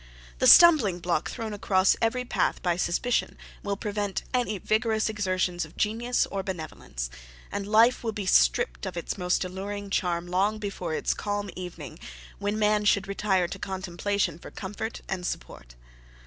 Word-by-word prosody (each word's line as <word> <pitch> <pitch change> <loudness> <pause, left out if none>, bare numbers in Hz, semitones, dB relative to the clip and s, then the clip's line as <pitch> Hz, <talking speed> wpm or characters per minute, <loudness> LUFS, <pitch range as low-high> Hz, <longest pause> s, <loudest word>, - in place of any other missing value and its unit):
The - - +4
stumbling 300 - +8
block 175 -2 -1
thrown 220 -2 -5
across 190 -2 +3
every 250 +2 +1
path - - 0
by 175 -2 +2
suspicion, 180 +7 0 0.2
will 200 -1 -2
prevent 205 -2 -3
any 240 -5 0
vigorous 220 +3 +1
exertions 185 -4 -1
of - - -12
genius 235 +3 +1
or 195 - -2
benevolence, 155 - -6 0.4
and 200 0 -3
life 225 +4 +4
will 225 - -1
be 205 -2 -5
stripped - - +3
of - - -6
its 170 - -3
most 180 0 0
alluring 200 +2 -6
charm 175 -3 0
long 195 +4 +1
before 195 -6 -4
its - - 0
calm 205 -1 -3
evening, 180 -1 -8 0.4
when 205 +1 -1
man 210 0 +2
should 200 -1 +2
retire 195 -2 +1
to - - -6
contemplation 190 -2 -2
for - - -10
comfort 210 +4 -6
and 185 -2 -3
support. - - -6
200 Hz, 160 wpm, -27 LUFS, 180-215 Hz, 0.4 s, stumbling